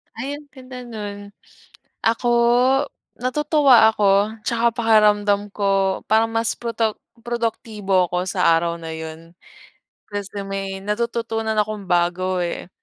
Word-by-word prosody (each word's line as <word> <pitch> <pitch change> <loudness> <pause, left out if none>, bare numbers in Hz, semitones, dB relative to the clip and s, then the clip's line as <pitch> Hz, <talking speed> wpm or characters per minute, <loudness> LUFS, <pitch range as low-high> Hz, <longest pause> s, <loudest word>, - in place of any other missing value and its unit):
Ay 275 +5 -4
ang 295 0 -15
ganda 255 -2 -11
nun. 205 -3 -8 0.7
Ako, 230 +2 +1 0.9
natutuwa 265 -2 +4
ako, 205 0 +2
tsaka 235 0 +2
pakiramdam 210 -3 +3
ko 195 -1 +1
parang 225 +2 +3
mas 225 0 0
proto 230 -2 -2 0.3
produktibo 220 -5 -1
ako 180 +1 -1
sa 180 -3 +3
araw 170 0 -1
na 165 -1 -6
yun. 160 +1 -9 0.8
Kasi 205 0 -5
may 195 -1 -4
natututunan 225 +1 -2
akong 210 -1 -1
bago 180 +1 +1
eh. 175 0 -4
210 Hz, 115 wpm, -21 LUFS, 195-230 Hz, 0.9 s, natutuwa